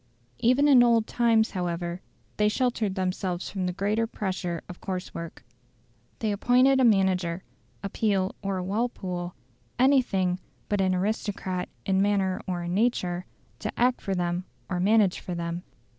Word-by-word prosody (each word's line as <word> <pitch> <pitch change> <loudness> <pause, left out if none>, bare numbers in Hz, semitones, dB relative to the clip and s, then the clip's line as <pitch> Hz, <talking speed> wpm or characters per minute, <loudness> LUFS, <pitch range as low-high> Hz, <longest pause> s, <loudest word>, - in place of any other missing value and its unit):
Even 255 +5 +4
in 265 -4 +7
old 230 -2 +4
times, 230 -2 +2
however, 175 -1 -3 0.4
they 210 0 +3
sheltered 225 -4 0
themselves 185 -1 -2
from 185 -2 -2
the - - 0
greater 210 +5 0
pressure 185 -6 -3
of 180 - -10
coarse 185 -2 -4
work. 170 -1 -8 0.7
They 220 -2 -1
appointed 250 +6 +4
a - - +4
manager 190 -5 +2 0.4
a 200 - -2
Peel 195 -3 0
or 195 -1 -2
a 180 - -2
Walpole, 185 -4 -3 0.4
anything 240 -9 +3 0.3
but 205 -1 +1
an 185 -1 +2
aristocrat 190 -2 -2 0.2
in 190 0 +2
manner 195 -2 +1
or 175 -2 -2
in 175 0 -3
nature 185 -5 0 0.3
to 215 - -3
act 245 +1 +3
for 195 - -2
them 175 0 -1 0.3
or 180 - 0
manage 200 0 +3
for 180 - -5
them. 170 0 -3
190 Hz, 155 wpm, -27 LUFS, 180-220 Hz, 0.7 s, in